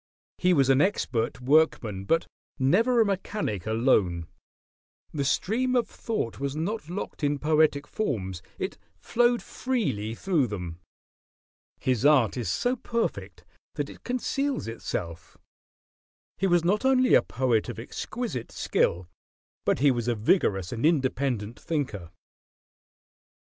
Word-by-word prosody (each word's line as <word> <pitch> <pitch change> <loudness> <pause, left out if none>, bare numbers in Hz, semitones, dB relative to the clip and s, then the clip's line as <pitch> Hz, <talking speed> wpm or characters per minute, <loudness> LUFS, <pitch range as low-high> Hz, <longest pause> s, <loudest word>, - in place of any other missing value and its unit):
He 180 - +3
was 140 -6 +4
an 135 +1 +4
expert 125 - 0
workman; 125 -8 +2
but 165 +9 +2 0.3
never 220 - +3
a - - +4
mechanic 195 - -2
alone. 110 -7 +2 0.9
The 145 - -1
stream 235 - +1
of 245 - +2
thought 215 - -4
was 140 0 -2
not 165 +2 -3
locked 180 -3 -5
in 145 0 +2
poetic 150 -1 +2
forms: 100 - -3 0.2
it - - -4 0.2
flowed 240 0 +2
freely 115 - -2
through 165 -4 +1
them. 90 -5 -6 1.0
His 130 -2 0
art 140 -7 +5
is 120 -4 -3
so 245 +1 +1
perfect 235 -1 -3 0.3
that - - -3
it - - -15
conceals 275 - -1
itself. 85 -7 -5 1.0
He 195 - +2
was 175 -2 +3
not 200 +7 +1
only 260 -1 +4
a - - +7
poet 120 -3 0
of - - -6
exquisite 125 - -5
skill, 85 +1 0 0.6
but - - +2
he 145 -1 +6
was 120 -2 -2
a 120 - +1
vigorous 105 - +1
and 115 -1 -4
independent 130 -7 0
thinker. 125 - -3
140 Hz, 130 wpm, -27 LUFS, -, 1.0 s, a